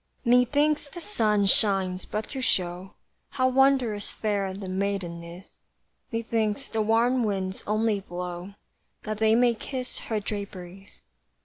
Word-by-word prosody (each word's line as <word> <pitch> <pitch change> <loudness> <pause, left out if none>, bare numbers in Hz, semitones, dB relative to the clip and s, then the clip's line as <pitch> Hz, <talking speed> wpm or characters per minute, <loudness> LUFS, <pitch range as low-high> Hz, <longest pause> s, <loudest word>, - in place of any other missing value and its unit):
Methinks 285 +5 +3
the 345 - -8
sun 215 - +2
shines 190 -2 +2
but 215 +1 -4
to 270 - -4
show 180 -5 -1 0.3
How 255 -2 +1
wondrous 255 -5 +2
fair 200 -3 -1
the 190 0 -7
maiden 185 -3 -2
is; 170 +3 -12 0.5
Methinks 230 +1 -1
the 220 - -1
warm 235 +3 +3
winds 190 -3 -2
only 215 0 +1
blow 180 +1 -6 0.5
That 215 -1 -4
they 220 0 +4
may 240 0 +4
kiss 255 +2 -5
her 220 -2 -2
draperies. 195 -2 -7
210 Hz, 130 wpm, -26 LUFS, 190-240 Hz, 0.5 s, they